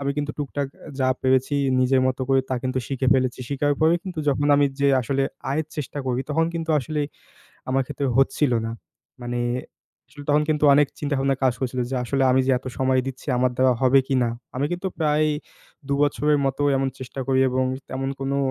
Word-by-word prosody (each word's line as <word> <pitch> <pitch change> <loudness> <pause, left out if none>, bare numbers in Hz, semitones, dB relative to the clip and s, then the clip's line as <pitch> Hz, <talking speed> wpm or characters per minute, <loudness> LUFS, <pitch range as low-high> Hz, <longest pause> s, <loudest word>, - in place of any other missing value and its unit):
আমি 140 0 -1
কিন্তু 145 0 -1
টুকটাক 145 -1 -2
অ্যা, - - -12
যা 130 - +3
পেরেছি 130 +2 +2 0.3
নিজের 130 +1 +3
মতো 130 0 -1
করে 135 0 +4
তা - - +1
কিন্তু 130 0 -1
শিখে 135 -1 -2
ফেলেছি 130 -1 0
শিখাই 145 +1 +1
পারেই 160 +2 +4
কিন্তু 180 -4 -6
যখন 145 +1 +1
আমি 145 0 +4
যেয়ে 140 -1 +4
আসলে 135 +3 0 0.3
আয়ের 155 +3 -1
চেষ্টা 145 -1 -4
করি 125 0 0
তখন 160 +2 +2
কিন্তু 165 -1 -3
আসলে 150 +3 -3 0.7
আমার 135 +1 +2
ক্ষেত্রে 140 - -3
হচ্ছিলো 135 -2 +2
না। 115 - -4 0.5
মানে 120 0 -3 0.7
আসলে 145 +2 -12
তখন 150 +1 +4
কিন্তু 150 -1 +1
অনেক 145 -1 +4
চিন্তাভাবনা 140 -2 0
কাজ 130 -2 +4
করছিলো 125 -1 -1
যে 135 - -1
আসলে 135 +2 0
আমি 130 - +4
যে 135 - +3
এত 130 - -17
সময় 130 0 +2
দিচ্ছি 135 -1 -7
আমার 125 0 +2
দ্বারা 130 0 +4
হবে 130 +1 +5
কিনা? 130 -3 +2 0.3
আমি 140 +3 +1
কিন্তু 180 +2 -2
প্রায় 155 -1 +2 0.6
দু 140 - +1
বছরের 145 0 +2
মতো 135 +1 -1
এমন 135 0 0
চেষ্টা 130 +1 -7
করি 130 -1 +2
এবং 130 +1 +1 0.2
তেমন 135 +1 -3
কোনো 135 +1 -1
135 Hz, 200 wpm, -23 LUFS, 130-145 Hz, 0.7 s, হবে